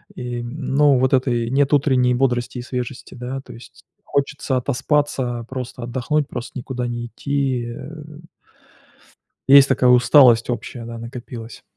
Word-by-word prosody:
и, 120 -1 -5
ну, 140 +2 +1
вот 130 +1 +1
этой 120 -3 +1
нет 140 +2 +2
утренней 130 -3 +3
бодрости 125 -1 0
и - - -4
свежести, 125 +1 -6
да? 130 +2 -6
То - - -13
есть 115 - -15 0.2
хочется 140 -2 -1
отоспаться, 130 -2 -1
просто 125 -1 -6
отдохнуть, 130 +4 -1
просто 125 -1 -7
никуда 125 0 -4
не 120 0 -4
идти, 135 0 -2
э 120 - -8 1.6
Есть 140 0 +8
такая 125 - +3
усталость 125 -1 +6
общая, 120 0 -5
да, 115 0 -7
накопилась. 115 -1 -9
125 Hz, 140 wpm, -21 LUFS, 120-135 Hz, 1.6 s, Есть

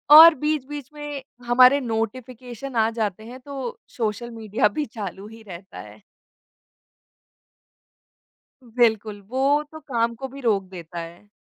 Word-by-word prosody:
और 330 +1 +11
बीच-बीच 295 -2 -2
में 295 -2 -6 0.2
हमारे 255 +3 +6
नोटिफ़िकेशन 245 +2 -4
आ 225 -1 +3
जाते 215 -1 -2
हैं 250 +3 -10
तो 280 - -6 0.2
सोशल 230 +1 -2
मीडिया 220 -1 +1
भी 290 +9 -2
चालू 205 -4 -7
ही 225 +1 -13
रहता 185 +1 -10
है। - - -12 2.6
बिल्कुल, 220 -3 +1
वो 275 +3 +2
तो 315 - -9
काम 235 -5 -1
को 265 +3 -6
भी 275 +2 -11
रोक 215 -6 +2
देता 170 -2 -8
है। 170 +4 -10
235 Hz, 130 wpm, -24 LUFS, 215-275 Hz, 2.6 s, और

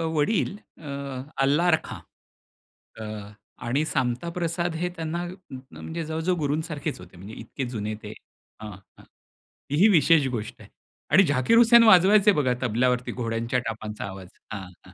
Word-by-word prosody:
वडील 190 +6 +1 0.3
अ, 150 - -10 0.6
अल्ला 150 +6 +3
रखा. 160 - -1 1.0
अ, - - -6 0.6
आणि 135 +6 +1
सामता 125 +2 -1
प्रसाद 170 0 -2
हे 180 +2 -2
त्यांना 165 +2 -3 0.5
म्हणजे 165 +1 -6
जवळ-जवळ 160 +3 -1
गुरूं 150 0 0
सारखेच 150 -2 -4
होते. - - -14
म्हणजे 100 +5 -10
इतके 135 - -5
जुने 110 -3 -4
ते 105 0 -7 0.5
हं, 105 -1 -7
हं. 95 0 -17
ती 145 - -12
ही 210 - +8
विशेष 160 -5 +4
गोष्ट 115 -4 -5
आहे. - - -15 0.4
आणि 195 - +7
झाकीर 145 - +2
हुसेन 235 0 +7
वाजवायचे 205 0 +6
बघा 145 -9 +1
तबल्यावरती 125 +1 0
घोड्यांच्या 115 +1 -2
टापांचा 110 -1 -5
आवाज. 95 -1 -8 0.2
हां, 105 - -5 0.2
हां, 90 - -16
145 Hz, 150 wpm, -25 LUFS, 115-170 Hz, 1.0 s, ही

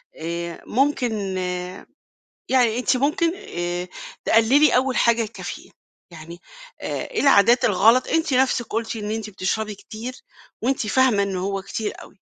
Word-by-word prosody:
آآ، 170 +1 -5
ممكن 260 -1 +1 1.4
يعني 245 -3 +3
أنت 255 +1 +2
ممكن 320 +6 +1
آآ، 175 - -4 0.4
تقلّلي 260 +7 +4
أول 255 0 +1
حاجة 235 0 +3
الكافيين، 225 +1 -8 0.4
يعني 170 +1 -11 0.4
آآ، - - -4
إيه 465 - -2
العادات 240 -2 +5
الغلط 225 +5 +4
أنتِ 320 -3 +1
نَفْسِك 255 -2 +2
قُلتِ 225 +1 -3
إن 210 -1 -4
أنتِ 220 -1 -4
بتشربي 210 +2 -2
كتير، 220 +5 -8 0.5
وأنتِ 255 -1 0
فاهمة 240 -2 +3
إنّه 195 -2 -2
هو 195 +1 -2
كتير 210 +2 -4
أوي. - - -17
225 Hz, 135 wpm, -22 LUFS, 200-260 Hz, 1.4 s, العادات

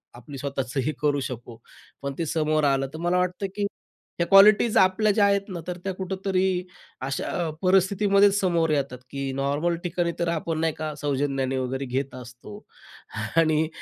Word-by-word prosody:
आपली 130 +4 -10
स्वतःचंही 135 +1 -2
करू 145 -1 +2
शकू, 120 -1 -8 0.4
पण 140 0 -3
ते 165 - -1
समोर 155 -1 0
आलं, 135 -1 +2
तर - - -6
मला 175 +1 +1
वाटतं, 180 +2 -1
की 205 -1 0 0.5
ह्या 170 - +2
क्वालिटीज 205 +3 +6
आपल्या 190 +3 +4
ज्या 205 0 +3
आहेत 200 0 +3
ना, 175 -2 -5
तर 180 0 -4
त्या 190 -1 -2
कुठेतरी 190 0 -1 0.6
अशा 150 +5 -2
परिस्थितीमध्येच 195 +2 +4
समोर 170 -4 +1
येतात, 140 -4 -1
की 140 -1 -4
नॉर्मल 145 +5 0
ठिकाणी 175 -1 -1
तर 170 - 0
आपण 165 -1 -2
नाही 160 -1 +1
का 155 -1 -4
सौजन्याने 135 -2 -1
वगैरे 130 +1 -2
घेत 130 +1 -3
असतो 125 -4 -10 0.8
आणि 155 -1 +3
160 Hz, 160 wpm, -25 LUFS, 135-185 Hz, 0.8 s, क्वालिटीज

